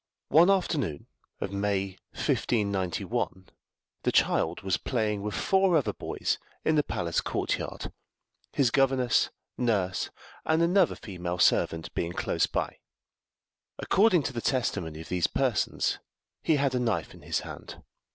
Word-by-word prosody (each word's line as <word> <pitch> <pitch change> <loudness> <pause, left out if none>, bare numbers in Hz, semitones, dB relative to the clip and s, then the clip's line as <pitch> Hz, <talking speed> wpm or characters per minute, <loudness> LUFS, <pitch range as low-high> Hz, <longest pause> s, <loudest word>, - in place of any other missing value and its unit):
One 170 +4 +6
afternoon 155 - 0 0.3
of 100 - -3
May 100 -1 0 0.2
1591, 95 -3 -1 0.5
the - - +1
child - - +2
was 95 -2 +1
playing 110 -5 -1
with 105 0 -3
four 190 -3 +3
other 145 - 0
boys - - -2 0.3
in 155 - +3
the 150 - +4
palace 85 - -1
courtyard, - - -3 0.6
his 130 -5 +2
governess, 130 -3 +3 0.3
nurse, 100 -7 0 0.3
and 160 +1 +2
another 180 +1 +3
female 90 -3 -5
servant 80 -2 +2
being 85 0 -2
close - - 0
by. - - -3 1.0
According 190 -6 +3
to 135 - -3
the 120 - -3
testimony 85 - -1
of 80 - -11
these 90 -2 +1
persons - - 0 0.4
he 160 - +3
had 140 -2 +1
a 125 - +1
knife 115 -4 -1
in - - -14
his - - -1
hand. - - -9
115 Hz, 135 wpm, -28 LUFS, 95-150 Hz, 1.0 s, One